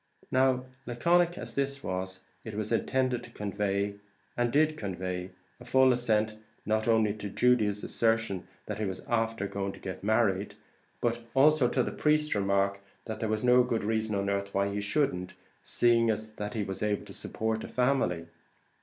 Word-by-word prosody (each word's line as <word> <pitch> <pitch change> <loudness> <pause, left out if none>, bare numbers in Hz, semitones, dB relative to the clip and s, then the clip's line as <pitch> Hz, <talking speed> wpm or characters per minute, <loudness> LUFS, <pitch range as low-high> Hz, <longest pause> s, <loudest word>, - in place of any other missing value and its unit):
Now, 130 -1 +3 0.2
laconic 170 +8 +2
as - - -5
this 140 0 -1
was, 95 0 -4 0.2
it 110 -2 -7
was 110 +1 -2
intended 130 +1 +1
to - - -11
convey, 100 0 -2 0.4
and 120 -1 +1
did 155 +3 +3
convey, 90 -5 -4 0.3
a - - -11
full 130 -1 +5
assent 110 -3 +1 0.3
not 110 +1 0
only 110 -2 +3
to 105 -1 -6
Judy's 105 -3 +2
assertion 115 -4 0 0.2
that 105 0 -5
he 110 - 0
was 95 -1 -4
"afther 115 -3 0
going 100 0 -3
to - - -12
get 95 0 -7
married," 105 -2 +1 0.5
but 120 0 0
also 145 -1 +5
to 125 0 +1
the - - -3
priest's 150 0 +2
remark, 100 0 +1 0.3
that 110 - -5
there 110 - -1
was 110 +1 -1
no 125 0 +6
good 120 -3 0
reason 110 0 0
on 100 0 -1
earth 100 0 -1
why 100 0 +2
he 105 - -2
shouldn't, 105 -5 -1 0.3
seeing 115 -1 +3
that 110 0 -3
he 105 - 0
was 95 -1 -5
able 105 -1 0
to - - -10
support 110 0 -2
a - - -5
family. 125 -10 +1
110 Hz, 175 wpm, -29 LUFS, 100-125 Hz, 0.5 s, no